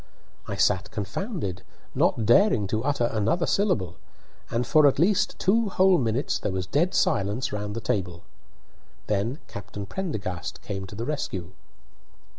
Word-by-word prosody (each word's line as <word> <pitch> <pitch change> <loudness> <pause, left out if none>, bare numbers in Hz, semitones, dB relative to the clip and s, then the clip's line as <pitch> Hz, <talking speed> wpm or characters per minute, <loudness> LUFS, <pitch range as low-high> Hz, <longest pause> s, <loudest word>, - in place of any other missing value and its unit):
I - - -3
sat 95 +2 +2
confounded, 105 - -4 0.3
not 115 - +2
daring 125 - +5
to 110 +2 -1
utter 140 -3 0
another 115 - +1
syllable, 110 - 0 0.5
and 120 +1 -1
for 155 -2 +5
at 135 - +2
least 185 +6 +2
two 220 +2 +2
whole 190 -1 +4
minutes 120 +2 0
there - - -2
was 95 -1 -2
dead 160 - +1
silence 105 +6 +1
round 105 0 -3
the 115 - -3
table. 90 -5 -2 0.8
Then 105 +6 -1
Captain 100 0 -7
Prendergast 100 - -4
came 95 -2 -5
to 100 - -10
the 115 +3 -4
rescue. 95 - -3
110 Hz, 145 wpm, -26 LUFS, 100-160 Hz, 0.8 s, daring